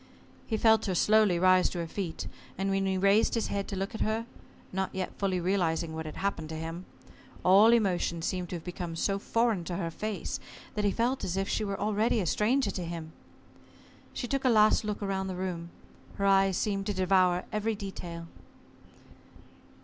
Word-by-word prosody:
He 220 - 0
felt 220 -1 +4
her 185 - 0
slowly 210 -1 +4
rise 185 +1 +4
to - - -6
her 170 - -2
feet, 170 -1 -4 0.3
and 195 +1 -1
when 195 0 +1
he 190 0 0
raised 200 +5 +3
his 230 - -1
head 200 -1 -2
to 200 - -4
look 195 +1 -3
at 220 - -5
her 220 +1 0 0.5
not 190 0 -1
yet 190 -1 -3
fully 190 -2 0
realizing 170 -3 0
what 160 0 -5
had 155 - -7
happened 175 -5 -2
to 160 - -5
him 165 +3 -5 0.6
all 200 +5 +7
emotion 180 -7 +1
seemed 180 0 -2
to - - -4
have 165 - -7
become 175 -2 -5
so 195 +4 0
foreign 230 -3 +1
to 175 - -3
her 170 -2 -2
face, 215 +4 -4 0.3
that 210 -1 -1
he - - +4
felt 245 +6 0
as 180 +1 -2
if 195 0 0
she 215 - -1
were 200 -2 -3
already 215 +2 +1
a 190 - -1
stranger 215 - +2
to 180 - -4
him. 165 -2 -6 1.0
She 245 - -4
took 275 +2 -1
a 260 - +4
last 215 -2 +5
look 210 0 -3
round 190 -1 -2
the 185 - -4
room. 180 -2 -4 0.5
Her 200 - -1
eyes 195 -1 +4
seemed 200 -1 -1
to 205 - -1
devour 185 -1 +3
every 215 +1 -1
detail. 175 -4 -7
195 Hz, 195 wpm, -29 LUFS, 175-210 Hz, 1.0 s, all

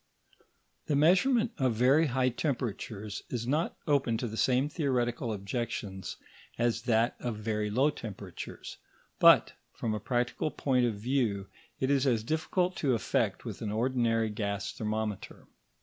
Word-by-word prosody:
The 145 - +1
measurement 220 - +4
of 130 -3 +2
very 135 +7 +4
high 130 0 +2
temperatures 115 - -3
is 120 -2 -3
not 150 +7 0
open 135 -6 +2
to 120 - -2
the 110 - -6
same 130 +4 +2
theoretical 125 -6 -1
objections 100 -2 -4 0.4
as 115 -1 +1
that 115 +1 +3
of 120 -2 -3
very 105 -1 -1
low 130 +8 +3
temperatures; 100 - -8 0.4
but, - - +7 0.2
from 110 - -2
a 105 - -2
practical 120 +6 -1
point 130 -4 +1
of 115 - -2
view, 105 -4 -1 0.3
it 130 +1 +1
is 140 -1 +3
as 115 -4 +2
difficult 175 +6 0
to 135 -5 +2
effect 110 - -1
with - - -6
an 105 - -2
ordinary 115 -1 +1
gas 100 -2 -3
thermometer. 110 -1 -4
120 Hz, 145 wpm, -30 LUFS, 110-135 Hz, 0.4 s, but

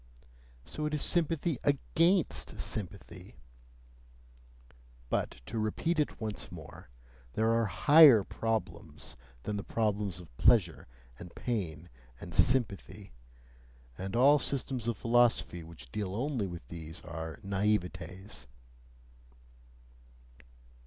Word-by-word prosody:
So 150 0 -4
it 150 - -2
is 150 - +1
sympathy 165 -3 +1
AGAINST 165 +5 +1
sympathy! 95 -2 -4 1.8
But - - -2
to 115 - -4
repeat 155 +10 -1
it 150 - -1
once 110 -4 -5
more, - - -11 0.4
there 110 +1 +2
are 115 -1 +2
higher 145 - +7
problems 115 +2 -4 0.3
than 105 - -3
the 100 - -4
problems 105 -5 -1
of 80 -9 -14
pleasure 100 -9 +3 0.3
and 90 -1 -11
pain 90 -9 -3 0.3
and - - -9
sympathy; 100 -5 +1 0.8
and 95 - -5
all 140 +5 +6
systems 130 -4 -2
of 120 - -1
philosophy 115 -7 +2
which 75 -7 -13
deal 100 -2 -3
only 125 -3 -1
with 85 -8 -9
these 80 -1 -8
are 80 -3 -6
naivetes. 95 - -2
105 Hz, 105 wpm, -31 LUFS, 90-125 Hz, 1.8 s, higher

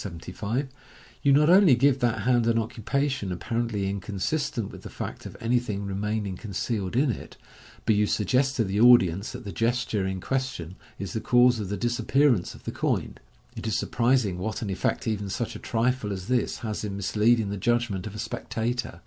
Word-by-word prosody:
75), 100 - -4 0.5
you 140 - +4
not 150 +2 +5
only 180 -5 +7
give 135 +2 +3
that 115 -4 +1
hand 120 -1 +3
an 115 0 +3
occupa 115 +4 -1
tion 130 -9 -3
apparently 115 +1 -2
inconsistent 105 - -2
with - - -11
the - - -9
fact - - -6
of - - -11
anything 115 -4 -1
remaining 100 0 -2
con 100 +2 -8
cealed 100 -1 -2
in 135 +1 +3
it, - - -8 0.5
but 110 - +4
you 105 0 +2
suggest 130 +8 +1
to 115 - +2
the 100 0 -1
audience 105 -6 +5
that 125 0 -8
the 100 - -5
gesture 115 -4 0
in 95 0 -3
question 130 -8 -3 0.2
is 100 -4 -5
the 110 - -2
cause 125 0 +4
of 100 -3 -4
the 100 - -2
disappearance 120 -2 +1
of - - -15
the - - -4
coin. - - -2 0.4
It - - -5
is 110 - +1
surprising 115 -6 +1
what 110 +4 -3
an 100 - -3
effect 95 - -1
even 105 -2 -2
such - - -3
a - - -6
trifle 120 -2 0
as 95 -1 -5
this 125 -1 0
has 110 -1 -3
in 100 -2 -4
misleading 105 +2 +2
the 100 - -3
judg 120 +3 +1
ment 95 0 -4
of 105 - -8
a - - -6
spectator. 115 -4 -3
110 Hz, 200 wpm, -26 LUFS, 100-125 Hz, 0.5 s, only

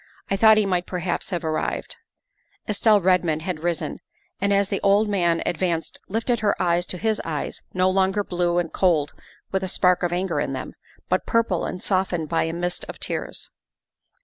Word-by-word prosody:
" - - -30
I - - +3
thought 220 +2 +6
he 215 - +3
might 180 -2 0
perhaps 180 -1 -2
have 175 -4 -3
arrived." 155 -1 -2 0.7
Estelle 210 0 +4
Redmond 175 -4 +2
had 180 -3 -3
risen, 170 0 -2 0.4
and 200 +1 +1
as 200 0 +2
the 195 - -1
old 200 +2 +4
man 175 -5 +1
ad 175 - -1
vanced 170 -3 -1
lifted 230 +4 0
her 210 -2 +1
eyes 175 0 +1
to 180 - -4
his 220 +3 0
eyes 155 -3 -4
no 185 0 +2
longer 190 +2 +2
blue 175 -2 0
and 175 -2 -1
cold 160 -6 +2 0.4
with 190 - 0
a - - -1
spark 180 -1 +3
of 175 -1 0
anger 185 +2 -1
in - - -1
them, - - -5 0.3
but - - 0
purple 230 -7 +1
and 180 - -5
softened 185 -5 0
by 165 - +1
a 165 - -2
mist 175 +1 -3
of - - -7
tears. - - -4
180 Hz, 195 wpm, -24 LUFS, 175-200 Hz, 0.7 s, thought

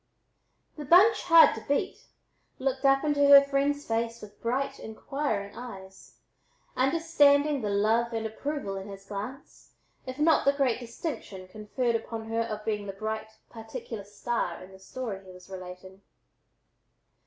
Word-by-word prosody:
The 300 - -6
"bunch 395 +9 +6
hard 335 -2 +7
to - - -7
beat" 285 0 -1 0.5
looked 265 0 -2
up 275 +1 +4
into 290 -1 +2
her 280 0 +10
friend's 280 +1 0
face 230 +1 -2
with 210 -1 -13
bright, 255 +4 -2
inquiring 220 -3 -4
eyes, 195 -6 -11 0.6
understanding 285 0 +3
the 210 - -2
love 220 +4 +1
and 225 -1 -3
approval 220 -2 -4
in 195 +1 -7
his 195 -1 -10
glance 210 +7 -8 0.3
if 255 0 -6
not 315 +2 +3
the 280 - +3
great 270 -4 +1
distinction 235 - -7
conferred 215 +5 -2
upon 225 0 -5
her 225 0 0
of 215 -2 -5
being 210 -2 -2
the 195 - -5
bright, 220 +2 -4 0.2
particular 225 -1 -8
star 205 -3 -3
in 185 - -14
the 190 - -14
story 200 -1 -6
he 190 - -13
was 180 +1 -15
relating. 185 +1 -10
230 Hz, 150 wpm, -28 LUFS, 205-280 Hz, 0.6 s, her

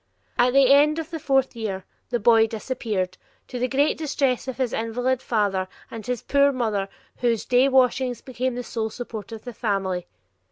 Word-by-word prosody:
At 245 +1 +3
the 275 -1 +6
end 300 +2 +5
of 325 0 -5
the 325 - -4
fourth 270 -3 +1
year 200 -5 -4 0.2
the 240 - 0
boy 225 0 +5
disappeared, 215 -5 -3 0.3
to 250 - -5
the 250 - +1
great 280 +5 +1
distress 275 -5 0
of 260 - -4
his 255 -3 -1
invalid 245 +3 -1
father 200 -6 0 0.2
and 225 -1 -7
his 250 +1 -3
poor 280 0 +4
mother 215 -7 -1 0.3
whose 235 -3 0
day 255 +2 +4
washings 255 -2 +2
became 255 -1 -3
the 245 - -4
sole 225 -2 -3
support 225 -2 -7
of 225 -1 -8
the 245 - -7
family. 195 -5 -2
245 Hz, 185 wpm, -24 LUFS, 220-260 Hz, 0.3 s, the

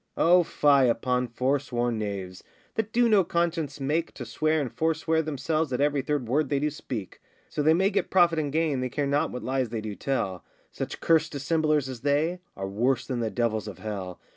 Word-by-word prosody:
O 180 +2 +6
fie 140 -5 +3
upon 125 +2 0
forsworn 120 -2 -1
knaves, 95 -3 -5 0.3
That 220 -1 -2
do 240 +1 +3
no 210 -4 +5
conscience 170 -3 -1
make 150 +5 -1
To 125 - -6
swear 155 +7 0
and 135 -6 -3
forswear 160 0 +1
themselves 155 0 -1
At 125 - -1
every 145 0 +2
third 140 -2 -2
word 140 +3 +1
they 140 - +1
do 150 +1 0
speak: 120 -8 -7 0.3
So - - -2
they 155 +2 +5
may 190 +3 +2
get 205 - 0
profit 175 -3 +4
and 145 -2 -2
gain, 155 -3 +1
They 125 0 -2
care 145 +4 -1
not 140 +1 +1
what 125 - -6
lies 130 -2 -1
they 115 0 -3
do 105 -1 -5
tell; 100 -7 -2 0.3
Such - - -5
cursed 165 -2 +3
dissemblers 150 0 +1
as 130 -2 -6
they 150 +5 +1 0.2
Are 95 0 -3
worse 120 +6 0
than 125 -2 -3
the 115 -2 -1
devils 110 -2 -1
of 100 - -7
hell. 95 -4 -6
140 Hz, 205 wpm, -27 LUFS, 120-160 Hz, 0.3 s, O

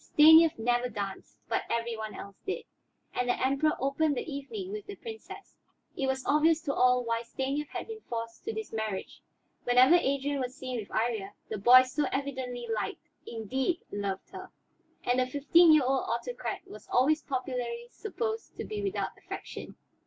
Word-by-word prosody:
Stanief 320 +1 +7
never 245 +2 +1
danced, 200 -3 -6
but - - 0
every 235 0 -1
one 220 -1 -6
else 200 -1 -9
did, 385 - -3 0.5
and 250 0 -1
the - - +1
Emperor 275 +4 +2
opened 275 +2 +1
the - - -1
evening 345 +7 -5
with 420 -1 -6
the 405 - -6
Princess. 445 +1 -10 0.4
It 270 - -1
was 265 0 -1
obvious 310 +2 +4
to 280 -3 -2
all 250 -1 +4
why 230 -1 -1
Stanief 270 +5 -3
had - - -6
been 445 -1 -7
forced 230 -1 -5
to 445 - -1
this 440 - -5
marriage, 220 -3 -4 0.4
whenever 250 +5 +6
Adrian 280 -4 +2
was 255 -1 -3
seen 255 -3 -4
with 205 - -7
Iría; 220 -3 -1 0.2
the 215 - -3
boy 250 +5 +8
so 280 +4 -1
evidently 260 -3 -3
liked, 215 -3 -3 0.2
indeed, 260 - -2
loved 200 -1 -4
her. - - -8 0.5
And 245 +1 +2
the 255 - +2
fifteen 305 +5 +5
year 305 -3 +6
old 265 0 +1
autocrat 240 - -3
was 215 - -12
always 300 +5 +3
popularly 250 -3 -3
supposed 445 +1 -4
to - - -3
be 425 -1 -4
without 400 -1 -2
affection. - - -8
260 Hz, 175 wpm, -30 LUFS, 235-310 Hz, 0.5 s, boy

